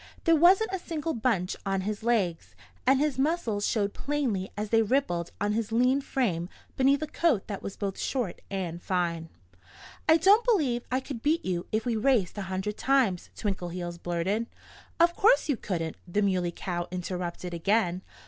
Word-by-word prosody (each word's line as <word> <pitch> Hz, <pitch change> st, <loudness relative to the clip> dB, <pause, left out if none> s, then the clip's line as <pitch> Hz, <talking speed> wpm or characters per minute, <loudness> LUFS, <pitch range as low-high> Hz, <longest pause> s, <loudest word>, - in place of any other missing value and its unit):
There 330 Hz, -1 st, +5 dB
wasn't 375 Hz, +7 st, +5 dB
a 380 Hz, -, -1 dB
single 325 Hz, -2 st, -3 dB
bunch 215 Hz, -6 st, 0 dB
on 195 Hz, -1 st, -1 dB
his 205 Hz, +2 st, -3 dB
legs. 215 Hz, -8 st, 0 dB, 0.3 s
And 265 Hz, +1 st, +5 dB
his 290 Hz, -3 st, 0 dB
muscles 265 Hz, -9 st, 0 dB
showed 205 Hz, -3 st, 0 dB
plainly 255 Hz, -10 st, -2 dB
as 210 Hz, 0 st, -3 dB
they 225 Hz, -1 st, +5 dB
rippled 205 Hz, -8 st, 0 dB
on 205 Hz, +1 st, 0 dB
his 225 Hz, 0 st, -2 dB
lean 250 Hz, +4 st, +3 dB
frame 185 Hz, -11 st, -1 dB, 0.3 s
beneath 275 Hz, +3 st, +3 dB
a -, -, 0 dB
coat 295 Hz, -, +1 dB
that 200 Hz, -3 st, -5 dB
was 195 Hz, -, -7 dB
both 195 Hz, -2 st, -3 dB
short 245 Hz, -10 st, -2 dB
and 175 Hz, -3 st, -4 dB
fine. 170 Hz, -3 st, -1 dB, 0.8 s
"I 320 Hz, -, +8 dB
don't 400 Hz, +7 st, +5 dB
believe 295 Hz, -, +2 dB
I 255 Hz, +1 st, +1 dB
could 260 Hz, -3 st, -7 dB
beat 315 Hz, +5 st, +1 dB
you 175 Hz, -2 st, -2 dB
if 220 Hz, +2 st, 0 dB
we 240 Hz, -2 st, 0 dB
raced 220 Hz, -5 st, +2 dB
a 190 Hz, -2 st, -5 dB
hundred 190 Hz, +3 st, -3 dB
times," 255 Hz, -10 st, +1 dB
Twinkleheels 175 Hz, -3 st, -4 dB
blurted. 185 Hz, +7 st, -1 dB, 0.5 s
"Of 340 Hz, +1 st, +4 dB
course 450 Hz, 0 st, +4 dB
you 285 Hz, -, +2 dB
couldn't!" 165 Hz, -7 st, -3 dB
the 205 Hz, +4 st, 0 dB
Muley 185 Hz, -3 st, +1 dB
Cow 175 Hz, 0 st, -4 dB
interrupted 180 Hz, -1 st, -4 dB
again. 185 Hz, +1 st, +1 dB
210 Hz, 175 wpm, -28 LUFS, 180-275 Hz, 0.8 s, I